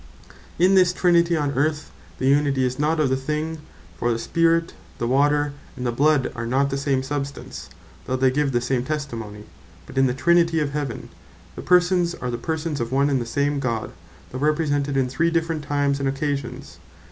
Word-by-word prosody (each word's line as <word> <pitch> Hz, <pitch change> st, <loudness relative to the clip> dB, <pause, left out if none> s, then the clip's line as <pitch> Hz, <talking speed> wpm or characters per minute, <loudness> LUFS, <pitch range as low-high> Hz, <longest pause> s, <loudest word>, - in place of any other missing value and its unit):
In 185 Hz, +3 st, +4 dB
this 180 Hz, -2 st, +5 dB
Trinity 170 Hz, -2 st, +3 dB
on 145 Hz, -2 st, 0 dB
Earth 150 Hz, +2 st, -1 dB, 0.3 s
the -, -, -3 dB
Unity 140 Hz, -1 st, +3 dB
is 125 Hz, +1 st, -3 dB
not 155 Hz, +2 st, +1 dB
of 150 Hz, -3 st, +2 dB
the 130 Hz, -, +2 dB
thing; 155 Hz, +4 st, -3 dB, 0.4 s
for 120 Hz, +8 st, 0 dB
the 115 Hz, -, 0 dB
Spirit, 165 Hz, +6 st, +1 dB, 0.2 s
the 120 Hz, -, -2 dB
Water, 145 Hz, +3 st, +2 dB, 0.2 s
and 125 Hz, -, -4 dB
the 120 Hz, -, +1 dB
Bloud, 145 Hz, +2 st, +2 dB
are 120 Hz, -1 st, -5 dB
not 135 Hz, +3 st, +1 dB
the 135 Hz, -, -1 dB
same 135 Hz, -2 st, 0 dB
substance, 140 Hz, 0 st, -5 dB, 0.4 s
though 130 Hz, -, -1 dB
they 130 Hz, 0 st, +3 dB
give 145 Hz, +1 st, 0 dB
the 120 Hz, -1 st, +1 dB
same 125 Hz, 0 st, 0 dB
testimony: 115 Hz, -8 st, -5 dB, 0.4 s
But 135 Hz, -, -4 dB
in 135 Hz, -, +5 dB
the 125 Hz, -, -1 dB
Trinity 170 Hz, +3 st, +3 dB
of 145 Hz, -2 st, -1 dB
Heaven, 145 Hz, -5 st, -4 dB, 0.5 s
the -, -, -6 dB
Persons 175 Hz, -1 st, +3 dB
are 125 Hz, -, -4 dB
the 120 Hz, -, -4 dB
persons 160 Hz, -1 st, -3 dB
of 115 Hz, -, -3 dB
one 140 Hz, +2 st, +2 dB
and 135 Hz, -2 st, +1 dB
the 120 Hz, -, -5 dB
same 145 Hz, +3 st, 0 dB
God, 115 Hz, -5 st, -2 dB, 0.4 s
though 130 Hz, -, -5 dB
Represented 145 Hz, -2 st, 0 dB
in 130 Hz, -1 st, +2 dB
three 150 Hz, +7 st, +1 dB
different 165 Hz, -2 st, -1 dB
times 140 Hz, -1 st, 0 dB
and 135 Hz, -1 st, 0 dB
occasions. 140 Hz, -1 st, -4 dB
140 Hz, 195 wpm, -23 LUFS, 130-155 Hz, 0.5 s, this